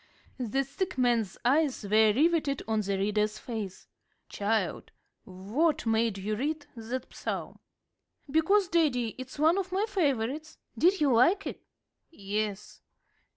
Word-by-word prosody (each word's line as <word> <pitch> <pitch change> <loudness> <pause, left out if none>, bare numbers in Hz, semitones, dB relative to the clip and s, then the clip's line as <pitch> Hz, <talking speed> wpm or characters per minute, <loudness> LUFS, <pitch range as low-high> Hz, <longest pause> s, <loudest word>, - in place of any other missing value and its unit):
The 255 +3 0
sick 365 +4 -4
man's 235 -6 +1
eyes 280 -1 +2
were 215 +1 +4
riveted 295 +2 +1
on 220 -1 +1
the 200 -1 -1
reader's 210 +2 0
face. 215 -5 -6 0.4
"Child, 205 -3 -1 0.3
what 220 - -1
made 225 -2 +1
you 210 +2 -2
read 290 +5 -2
that 240 +3 -6
Psalm?" - - -5 0.7
"Because, 350 +7 +3
daddy, 275 -10 +1
it's 260 +2 -8
one 320 +6 +4
of 375 -1 -4
my 390 +3 +1
favorites. 300 - -1 0.2
Did 365 +1 +3
you 280 -4 +4
like 340 - +4
it?" - - -6 0.5
"Yes." 205 -5 -4
250 Hz, 130 wpm, -29 LUFS, 215-315 Hz, 0.7 s, were